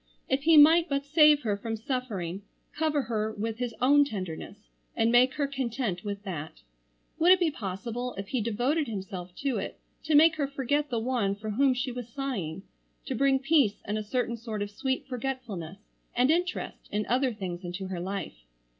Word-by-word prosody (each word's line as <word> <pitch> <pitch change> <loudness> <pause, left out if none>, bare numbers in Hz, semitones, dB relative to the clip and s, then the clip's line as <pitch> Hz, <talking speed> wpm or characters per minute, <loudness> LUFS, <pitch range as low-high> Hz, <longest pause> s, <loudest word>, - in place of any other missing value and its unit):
If 265 +1 +1
he 325 -1 +7
might 325 +3 +7
but 280 0 -1
save 300 0 +5
her 210 -3 0
from 225 +2 -4
suffering, 210 -7 -3 0.3
cover 305 -2 +1
her 220 -2 -1
with 220 +2 -4
his 245 -2 -3
own 285 +3 +6
tenderness 190 - -5 0.4
and 225 0 +2
make 250 +2 +5
her 290 - +1
content 245 -8 -3
with 200 -1 -5
that. 160 -6 -6 0.6
Would 350 +3 +7
it 375 - +2
be 340 -3 +2
possible 235 +3 -4
if 195 0 -6
he 255 - 0
devoted 245 +8 0
himself 190 -4 -6
to 275 -3 +1
it - - -5 0.3
to 310 - +2
make 310 +1 +6
her 285 -2 0
forget 280 +2 -1
the 240 - -1
one 225 -4 0
for 215 +1 -5
whom 260 +4 +3
she 255 +1 -2
was 245 -1 -7
sighing; 205 - -4 0.4
to 265 - -3
bring 270 +2 +3
peace 275 -6 +2
and 205 - -2
a 215 - -1
certain 235 +2 -1
sort 220 -3 -4
of 205 - -6
sweet 265 +4 -2
forgetfulness 240 -9 -5 0.4
and 250 +4 +4
interest 355 +2 -2
in 210 +1 -1
other 255 +1 +1
things 185 -4 -6
into 180 +2 -5
her 185 -2 -4
life? 180 - -5
240 Hz, 190 wpm, -28 LUFS, 205-275 Hz, 0.6 s, he